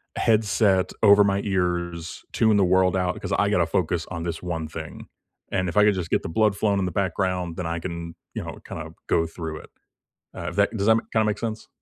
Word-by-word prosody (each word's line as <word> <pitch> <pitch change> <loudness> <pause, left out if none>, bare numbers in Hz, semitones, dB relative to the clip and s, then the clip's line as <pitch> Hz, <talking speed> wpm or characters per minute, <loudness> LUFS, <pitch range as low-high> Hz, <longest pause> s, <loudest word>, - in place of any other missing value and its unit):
headset 105 -3 +2
over 100 0 +8
my 100 0 +1
ears, 85 -4 -2
tune 110 -2 +3
the 100 - +4
world 95 0 +3
out, 90 -1 -1
'cause - - -5
I - - +2
gotta - - +3
focus 85 -2 0
on 85 -2 -4
this 85 -1 -4
one 80 -3 -3
thing, 80 0 -8 0.4
and 95 -1 0
if 85 - -5
I 105 - +7
could 105 0 +5
just 85 -2 -4
get - - +1
the - - -4
blood 105 +4 +2
flowing 100 -2 +1
in 95 - 0
the 90 - -2
background, 90 -2 -1
then 90 - -3
I 85 0 -2
can, 85 -1 -6 0.2
you - - -3
know, - - -7
kinda - - -7 0.2
go 80 - +2
through 80 -1 -6
it. - - -14 0.7
Uh, - - -4
if - - -10
that 100 +2 +2
does 100 -1 -1
that 110 - +6
ma 115 - -1
kinda 110 -1 +3
make 105 -1 0
sense? 110 -1 -4
95 Hz, 235 wpm, -24 LUFS, 85-100 Hz, 0.7 s, over